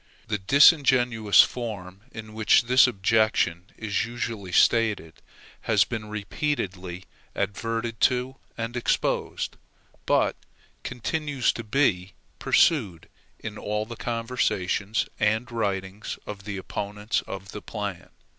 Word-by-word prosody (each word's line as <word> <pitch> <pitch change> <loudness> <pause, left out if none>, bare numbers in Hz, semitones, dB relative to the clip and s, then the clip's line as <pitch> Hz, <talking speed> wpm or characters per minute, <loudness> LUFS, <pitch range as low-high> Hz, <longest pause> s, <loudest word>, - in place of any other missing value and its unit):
The 105 -1 -1
disingenuous 125 - +5
form 100 -6 -6
in 110 -1 -9
which 110 +2 +4
this 125 +3 +6
objection 105 -5 +1
is 105 -3 -1
usually 115 -5 -5
stated 105 -4 +2 0.5
has - - +5
been 110 -2 -6
repeatedly 100 -5 -3 0.3
adverted 115 +3 -2
to 125 +1 +2 0.2
and 115 +1 -4
exposed, 120 - -1 0.5
but - - +2 0.5
continues 145 +1 -1
to 115 - -6
be 105 -6 +1 0.3
pursued 105 - +2 0.3
in 110 0 -7
all 105 +1 -2
the 115 +1 -8
conversations 110 -4 -1
and 110 +3 +1
writings 100 -3 -3
of 100 -2 -8
the 105 -2 -4
opponents 105 +3 -3
of 100 +1 -7
the 105 - -7
plan. 100 -5 -6
110 Hz, 110 wpm, -26 LUFS, 100-120 Hz, 0.5 s, this